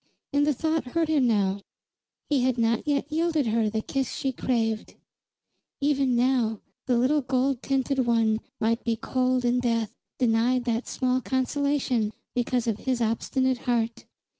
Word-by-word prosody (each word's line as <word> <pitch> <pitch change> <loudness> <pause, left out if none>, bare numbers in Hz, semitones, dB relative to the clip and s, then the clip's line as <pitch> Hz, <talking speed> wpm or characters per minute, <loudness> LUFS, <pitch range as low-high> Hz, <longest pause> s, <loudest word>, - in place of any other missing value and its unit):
And 290 +1 +3
the 300 - +3
thought 320 +3 0
hurt 330 -1 +1
him 285 -5 +3
now; 200 -3 +1 0.7
he 285 -4 +2
had 255 0 +1
not 230 +3 +1
yet 285 -1 0
yielded 320 -2 +1
her 225 -1 +1
the 220 0 -2
kiss 270 -2 -2
she 270 - -1
craved. 225 -4 -1 0.8
Even 275 -3 +2
now 240 -3 +1 0.3
the 250 -2 +3
little 275 +5 +3
gold 260 0 0
tinted 270 0 0
one 225 -2 +2 0.2
might 230 +2 0
be 230 -1 0
cold 255 +2 0
in 245 +1 +2
death, 230 -3 0 0.2
denied 245 +1 +2
that 235 0 -1
small 255 0 0
consolation 260 -4 0 0.2
because 245 -1 0
of 220 -2 -1
his 255 -2 -1
obstinate 250 +3 0
heart. 230 -1 0
250 Hz, 155 wpm, -26 LUFS, 230-270 Hz, 0.8 s, And